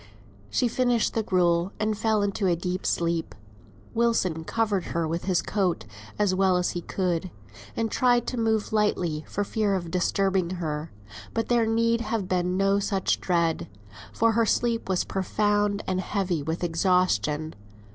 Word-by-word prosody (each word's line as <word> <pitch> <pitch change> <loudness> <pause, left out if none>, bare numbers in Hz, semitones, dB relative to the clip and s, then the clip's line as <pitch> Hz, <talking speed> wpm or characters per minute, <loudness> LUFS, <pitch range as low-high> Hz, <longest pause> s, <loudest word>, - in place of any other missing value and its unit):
She 245 - +1
finished 245 -1 +1
the 225 - +1
gruel, 175 -2 +1
and 215 0 0
fell 215 -1 +1
into 200 0 0
a 175 - +3
deep 180 +2 -3
sleep. 170 -1 -1 0.6
Wilson 225 -9 +1
covered 210 -4 0
her 165 -1 +1
with 165 +2 -3
his 185 -2 +1
coat 190 -4 -1 0.3
as 205 -3 +2
well 190 -1 +3
as 180 - 0
he 175 - -4
could, 180 -1 -2 0.5
and 225 -1 -1
tried 245 -2 +3
to 250 - -3
move 220 -1 0
lightly 175 -7 +1
for 205 - -2
fear 205 -1 0
of 170 -3 -4
disturbing 185 0 +1
her; 155 -2 -4 0.4
but 225 - -1
there 235 -2 +3
need 230 +1 +2
have 215 -3 -2
been 180 0 0
no 195 +1 +3
such 195 -2 0
dread, 170 -3 0 0.4
for 230 - +2
her 230 +1 +2
sleep 230 -2 0
was 185 -2 +1
profound 205 +1 0
and 185 0 -1
heavy 185 -4 -1
with 160 +4 -3
exhaustion. 165 - +1
190 Hz, 160 wpm, -26 LUFS, 175-220 Hz, 0.6 s, a